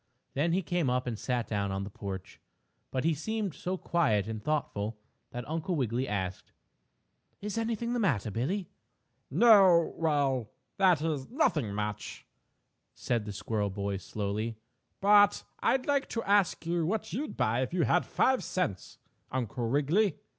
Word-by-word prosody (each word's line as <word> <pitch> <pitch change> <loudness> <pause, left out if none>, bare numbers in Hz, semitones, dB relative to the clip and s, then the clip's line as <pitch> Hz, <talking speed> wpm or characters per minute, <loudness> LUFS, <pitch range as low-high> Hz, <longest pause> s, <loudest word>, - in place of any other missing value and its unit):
Then 160 +5 +1
he 190 +2 +1
came 170 -3 0
up 125 0 0
and 115 -4 -3
sat 125 -3 -1
down 100 -2 -1
on 95 0 -2
the 100 - -7
porch, 95 -2 -7 0.5
but 130 - -2
he 165 +1 +3
seemed 205 +4 -2
so 185 +4 -3
quiet 140 - +1
and 110 -1 -4
thoughtful 110 -8 -2 0.3
that 120 -1 -6
Uncle 165 +3 -2
Wiggily 125 -2 0
asked: 95 -3 -4 0.9
"Is 210 +1 -4
anything 230 +1 -1
the 245 - 0
matter, 130 - +1
Billie?" 170 - -2 0.6
"No 195 -8 +6
well 140 -8 +1 0.3
that 180 -6 +4
is, 150 -5 -2
nothing 160 - +1
much," 105 0 -4 0.7
said 115 -3 -1
the 105 - -5
squirrel 105 0 -2
boy 100 0 -3
slowly, 105 +4 -3 0.4
"but 205 0 +5 0.2
I'd 260 -1 +2
like 280 -1 +1
to 230 - -2
ask 200 -4 +2
you 170 0 0
what 185 +1 -2
you'd 290 +8 -3
buy 115 +3 +1
if 130 - -2
you 175 -1 +1
had 175 - +3
five 260 -1 +2
cents, 105 - -3 0.3
Uncle 120 -2 -2
Wiggily." 150 - +2
145 Hz, 155 wpm, -30 LUFS, -, 0.9 s, No